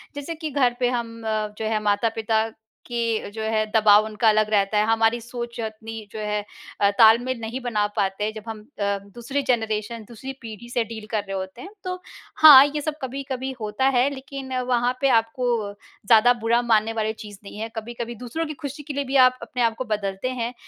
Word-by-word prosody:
जैसे 290 +3 -5
कि 315 -1 -5
घर 255 -3 +2
पे 245 - +2
हम 230 -2 -4
अ, 215 -1 0
जो 220 - -3
है 215 0 0
माता-पिता 220 +1 +1 0.4
के 230 -3 -1
जो 220 - -6
है 220 0 +1
दबाव 215 -1 +6
उनका 220 +1 +2
अलग 215 0 +3
रहता 205 0 +2
है, 210 - +3
हमारी 225 +1 +2
सोच 235 0 -7
अपनी 220 0 -7
जो 220 - -7
है 210 0 -1 0.4
अ, 200 - +5
ताल-मेल 235 +3 +6
में 225 - -4
नहीं 255 +3 -4
बना 215 -4 0
पाते, 200 +2 0
जब 215 - -7
हम 220 -1 -6 0.2
अ, 200 0 0 0.2
दूसरी 270 +4 -2
जनरेशन 220 -2 0
अ, - - -18
दूसरी 265 +4 -7
पीढ़ी 230 0 -9
से 240 -1 0
डील 220 -1 -8
कर 215 -2 0
रहे 195 -1 -6
होते 190 0 -6
हैं। 380 - -8 0.2
तो 365 0 -2 0.5
हाँ, 285 -3 +11
ये 295 +1 -3
सब 305 0 -3
कभी-कभी 265 0 -4
होता 215 +5 0
है, 260 +3 +4
लेकिन 265 0 -7 0.2
वहाँ 245 0 +2
पे 275 - +4
आपको 225 +3 -4 0.6
ज़्यादा 235 +2 +6
बुरा 235 +2 +3
मानने 225 -1 +2
वाली 220 -1 -1
चीज़ 210 -3 -11
नहीं 200 - -10
है। 225 +1 -4
कभी-कभी 235 +1 -5
दूसरों 250 +8 -4
की 305 - -5
खुशी 285 +2 -6
के 290 0 -6
लिए 285 - -1
भी 270 - -3
आप 255 0 -2
अपने 240 +2 -4
आप 230 -1 +2
को 255 - -3
बदलते 205 +1 -2
हैं, 235 +2 -2
230 Hz, 210 wpm, -24 LUFS, 215-255 Hz, 0.6 s, हाँ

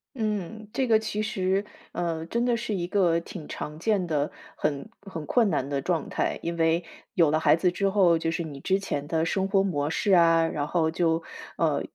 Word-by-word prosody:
嗯， 215 -1 -3
这 260 -2 0
个 220 -1 +5
其 215 -1 -3
实， 195 -2 0 0.3
呃， 165 -2 -2
真 235 +7 -1
的 240 -1 +2
是 230 -3 -3
一 175 -2 -2
个 175 -3 +2
挺 170 -3 -9
常 150 +1 -6
见 195 -2 +1
的， 150 -2 0 0.3
很 150 +7 -2
很 165 -6 -7
困 230 -5 +3
难 140 -4 -1
的 140 -1 -1
状 165 0 -1
态。 - - -1
因 170 0 -3
为 165 +1 +2 0.3
有 165 -4 +4
了 155 - +2
孩 160 - +5
子 175 +1 +2
之 195 +2 0
后， 185 -4 +4
就 165 0 -1
是 165 +1 -2
你 145 -3 -8
之 190 +7 +1
前 145 -7 -3
的 160 0 0
生 190 +2 0
活 195 -1 +3
模 145 -6 -1
式 200 +4 0
啊， 165 -1 +5
然 150 -2 -2
后 160 -1 +1
就 165 -1 +1 0.3
呃， - - +1
170 Hz, 225 characters per minute, -26 LUFS, 160-200 Hz, 0.3 s, 个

